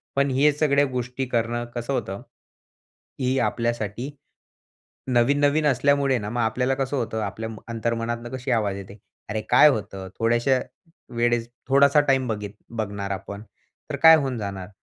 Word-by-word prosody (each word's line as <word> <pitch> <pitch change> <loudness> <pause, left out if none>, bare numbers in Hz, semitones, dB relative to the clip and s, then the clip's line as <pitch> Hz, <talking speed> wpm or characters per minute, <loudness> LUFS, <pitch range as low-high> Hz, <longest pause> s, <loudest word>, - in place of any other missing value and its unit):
पण 140 0 +2
हे 145 +3 +4
सगळ्या 145 -1 +2
गोष्टी 125 +1 -3
करणं 120 0 -1
कसं 120 +3 -3
होतं, 95 -5 -3 1.0
ही 130 +1 +1
आपल्यासाठी 120 +1 -2 1.0
नवीन-नवीन 145 +5 +2
असल्यामुळे 140 0 +2
ना 105 0 -5
मग 120 +1 -1
आपल्याला 125 +4 +1
कसं 135 +1 -2
होतं, 110 -3 -2
आपल्या 110 +2 -4
म 110 - -8
अंतर्मनातनं 115 +1 -3
कशी 130 0 -4
आवाज 105 -4 0
येते? 100 +1 -10 0.3
"अरे 110 0 -2
काय 150 - +7
होतं 95 -5 -4
थोड्याशा 120 +3 +2 0.6
वेळेस 120 0 +1 0.2
थोडासा 140 +2 +5
टाईम 135 -3 +1
बघीत 105 -2 -4 0.3
बघणार 100 -2 -3
आपण, 100 +2 -6 0.5
तर - - -1
काय 160 0 +10
होऊन 135 -4 -2
जाणार?" 100 -3 -5
120 Hz, 145 wpm, -24 LUFS, 110-135 Hz, 1.0 s, काय